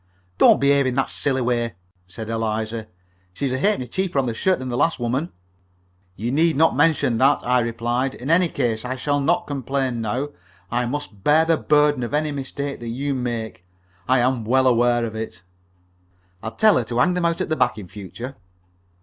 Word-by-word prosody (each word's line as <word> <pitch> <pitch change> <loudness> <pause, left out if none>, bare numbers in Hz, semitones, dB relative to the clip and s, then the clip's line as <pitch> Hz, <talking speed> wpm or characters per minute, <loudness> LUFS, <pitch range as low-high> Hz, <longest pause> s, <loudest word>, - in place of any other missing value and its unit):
"Don't - - +6
behave 140 -1 +3
in 125 - -1
that 135 - 0
silly 135 -2 +1
way," 120 -3 -1 0.3
said 110 +5 -8
Eliza. 110 0 -2 0.5
"She's 135 +7 -2
a 130 - -1
halfpenny 195 -8 +1
cheaper 185 +4 -2
on 135 - +2
the 120 - -2
shirt 185 +10 +1
than 130 0 -6
the 120 - -2
last 160 +4 +1
woman." 130 +8 -2 0.8
"You 115 +5 -3
need 160 +3 +3
not 160 +3 +3
mention 140 -8 +2
that," 135 +2 +4
I 125 +1 +3
replied. 120 +3 -1
"In 135 +5 -4
any 175 +1 +4
case 120 -7 -1
I 130 +1 -3
shall 145 +2 -1
not 140 - +1
complain 135 -3 -2
now. 125 +7 -2 0.4
I 120 +1 0
must 125 -7 -6
bear 155 +2 +4
the 165 0 +3
burden 150 -3 +2
of 120 +4 -2
any 150 0 0
mistakes 140 0 -5
that 120 - -7
you 135 +5 -2
make. 120 -7 -4 0.4
I 130 - +4
am 125 -1 +1
well 130 +4 +2
aware 120 -1 +3
of 110 - -5
it." 110 -5 -6 1.0
"I'll 110 - -4
tell 215 -1 +5
her 125 - +1
to 120 +1 -4
hang 150 +9 +3
them 180 -1 -1
out 170 0 0
at - - -2
the 155 - +1
back 125 -5 +1
in 100 -4 -8
future." 110 +8 -8
130 Hz, 200 wpm, -22 LUFS, 115-145 Hz, 1.0 s, Don't